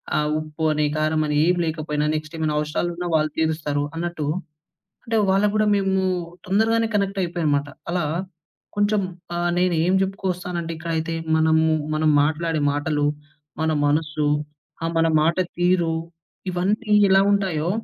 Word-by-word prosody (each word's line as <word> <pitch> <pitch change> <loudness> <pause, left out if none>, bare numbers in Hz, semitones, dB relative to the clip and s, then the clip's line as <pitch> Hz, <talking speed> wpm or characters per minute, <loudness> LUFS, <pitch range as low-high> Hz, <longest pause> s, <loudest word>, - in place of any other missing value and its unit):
ఆ - - +3 0.2
ఉప్పు 155 +1 -6
అని, 150 0 +1
కారమని, 155 -1 +1
ఏం 180 0 +3
లేకపోయినా, 155 -2 -2
నెక్స్ట్ 155 +1 -5
ఏమైనవసరాలున్నా 160 +3 -1
వాళ్ళు 155 -1 +1
తీరుస్తారు 155 -2 0
అన్నట్టు. 170 -2 -3 0.8
అంటే, 225 -1 0
వాళ్ళకు 200 +2 +3
గూడా 215 0 +3
మేమూ 190 -1 +1 0.4
తొందరగానే 225 +4 +2
కనెక్టయిపోయానమాట. 175 -7 0 0.2
అలా 175 -3 0 0.7
కొంచెం 205 0 +2 0.3
ఆహ్, 175 0 0
నేనేం 180 -1 +2
జెప్పుకొస్తానంటే 180 -3 -3
ఇక్కడైతే 165 0 -2 0.2
మనము, 160 0 +3 0.3
మనం 155 0 +2
మాట్లాడే 160 +1 0
మాటలు, 145 0 0 0.5
మన 160 0 +1
మనసు, 150 0 0 0.5
ఆహ్, 165 - -1
మన 165 0 +3
మాట 165 +2 +2 0.2
తీరు, 175 -2 +2 0.6
ఇవన్నీ 205 +5 0 0.2
ఎలా 195 0 +6
ఉంటాయో, 180 -5 0
165 Hz, 120 wpm, -23 LUFS, 155-185 Hz, 0.8 s, ఎలా